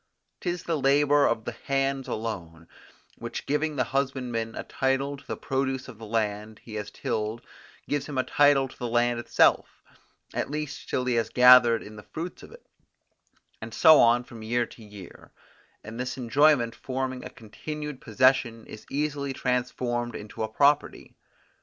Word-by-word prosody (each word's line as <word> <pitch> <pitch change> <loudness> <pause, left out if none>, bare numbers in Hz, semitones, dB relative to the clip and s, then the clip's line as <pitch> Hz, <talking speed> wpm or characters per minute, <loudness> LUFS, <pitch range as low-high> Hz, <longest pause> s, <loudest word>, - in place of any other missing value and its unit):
'Tis 175 0 -3
the 165 -3 -1
labour 145 +1 +4
of 110 -1 -1
the - - -3
hands 135 -1 -2
alone, 85 -7 -5 0.5
which 115 0 -6
giving 150 +2 -1
the - - +1
husbandman 125 -4 -2
a - - -5
title 135 +1 -1
to 140 - -15
the - - -4
produce 135 -1 -2
of 120 -4 -11
the 110 - -9
land 105 -1 -2
he 115 - -11
has 105 -1 -5
tilled 110 +2 -3 0.5
gives 145 -1 -2
him 145 -3 -5
a 130 - +2
title 145 -1 +3
to 130 - -15
the 125 - -3
land 120 0 +1
itself, 120 - +2 0.5
at - - -2
least 150 0 -5
till 125 - -1
he 125 - +1
has 115 -1 0
gathered 125 -2 +7
in 105 +1 -11
the - - -9
fruits 170 +3 -6
of - - -13
it, 475 +1 -15 1.0
and - - -7
so 160 -2 +7
on 120 +1 +5
from 120 -2 -12
year 120 +2 0
to 115 - -15
year; 105 -4 -13 0.5
and 110 +2 -8
this 125 +1 -3
enjoyment 130 -1 +3
forming 130 -1 -4
a - - -7
continued 150 +5 -7
possession 120 -1 +2
is 110 - -12
easily 140 -1 -2
transformed 125 -1 -2
into 105 +1 -8
a 110 - 0
property. 140 +5 +1
125 Hz, 170 wpm, -26 LUFS, 115-140 Hz, 1.0 s, gathered